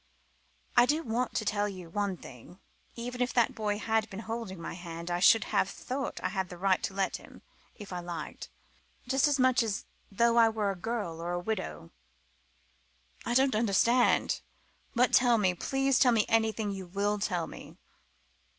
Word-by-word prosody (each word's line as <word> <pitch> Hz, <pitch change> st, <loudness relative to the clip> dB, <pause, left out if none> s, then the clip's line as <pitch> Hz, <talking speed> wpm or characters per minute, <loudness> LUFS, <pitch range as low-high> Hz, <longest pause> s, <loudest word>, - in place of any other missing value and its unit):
"I 240 Hz, 0 st, +6 dB
do 310 Hz, +4 st, +1 dB
want 240 Hz, 0 st, -2 dB
to 215 Hz, -, -1 dB
tell 205 Hz, 0 st, 0 dB
you 185 Hz, -3 st, -8 dB
one 200 Hz, +1 st, -2 dB
thing. 135 Hz, -, -13 dB, 0.4 s
Even 245 Hz, +1 st, -5 dB
if 250 Hz, -, 0 dB
that 240 Hz, -2 st, +3 dB
boy 210 Hz, -1 st, -1 dB
had 220 Hz, 0 st, 0 dB
been 195 Hz, +2 st, -7 dB
holding 225 Hz, -5 st, -5 dB
my 165 Hz, -, -6 dB
hand 170 Hz, 0 st, -7 dB
I 175 Hz, -, 0 dB
should 210 Hz, +3 st, +6 dB
have 190 Hz, -, +2 dB
thought 265 Hz, +6 st, -4 dB
I -, -, +1 dB
had 190 Hz, -3 st, -3 dB
a 180 Hz, -, -8 dB
right 190 Hz, +1 st, +2 dB
to 190 Hz, -, -4 dB
let 195 Hz, -1 st, 0 dB
him, -, -, -16 dB, 0.3 s
if 200 Hz, -4 st, -9 dB
I 180 Hz, -, -3 dB
liked 170 Hz, -3 st, -7 dB, 0.6 s
just 270 Hz, +2 st, +3 dB
as 290 Hz, -1 st, +2 dB
much 255 Hz, -1 st, +4 dB
as 215 Hz, -3 st, -2 dB, 0.3 s
though 235 Hz, +3 st, +3 dB
I 230 Hz, -1 st, +7 dB
were 215 Hz, -2 st, -1 dB
a -, -, -5 dB
girl, 190 Hz, -5 st, -4 dB
or 175 Hz, +1 st, -3 dB
a 175 Hz, -, -1 dB
widow." 175 Hz, -, -4 dB, 1.4 s
"I 240 Hz, -, 0 dB
don't 265 Hz, +1 st, +4 dB
understand. 230 Hz, +3 st, +3 dB, 0.5 s
But 245 Hz, +1 st, +3 dB
tell 240 Hz, -2 st, +5 dB
me 190 Hz, -4 st, +2 dB
please 270 Hz, +7 st, +1 dB
tell 250 Hz, -3 st, +5 dB
me 215 Hz, -2 st, +3 dB
anything 220 Hz, -2 st, +1 dB
you 190 Hz, -2 st, -6 dB
will 205 Hz, +3 st, -1 dB
tell 180 Hz, -5 st, -1 dB
me." -, -, -11 dB
210 Hz, 185 wpm, -30 LUFS, 185-235 Hz, 1.4 s, I